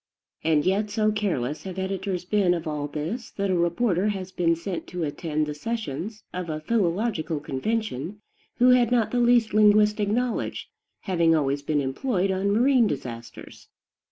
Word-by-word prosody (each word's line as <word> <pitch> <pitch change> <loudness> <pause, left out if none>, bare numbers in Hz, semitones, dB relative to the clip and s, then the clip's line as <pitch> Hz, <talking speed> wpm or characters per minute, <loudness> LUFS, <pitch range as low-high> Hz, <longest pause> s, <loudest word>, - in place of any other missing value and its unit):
And 155 -2 +2
yet 200 +3 +1
so 215 0 +1
careless 165 - -2
have 190 -1 -7
editors 190 -1 -3
been 185 -2 +2
of 170 -1 -5
all 150 -2 -3
this 160 - -4
that 200 -1 0
a - - +2
reporter 180 +3 +1
has 190 -3 -3
been 170 -2 +2
sent 170 +1 -5
to 175 -1 -4
attend 155 0 -2
the 150 - -4
sessions 210 - -4
of 180 -2 -4
a 155 -1 -3
philological 180 -3 0
convention 180 - -3 0.4
who 250 +1 +5
had 245 -2 +4
not 235 -3 +2
the 245 - +1
least 240 -2 +3
linguistic 210 0 +4
knowledge, 240 +2 -2 0.3
having 170 -4 +2
always 140 -2 0
been 145 0 0
employed 190 - -1
on 190 +1 0
marine 240 +3 +4
disasters. 120 - -7
190 Hz, 160 wpm, -25 LUFS, 155-215 Hz, 0.4 s, who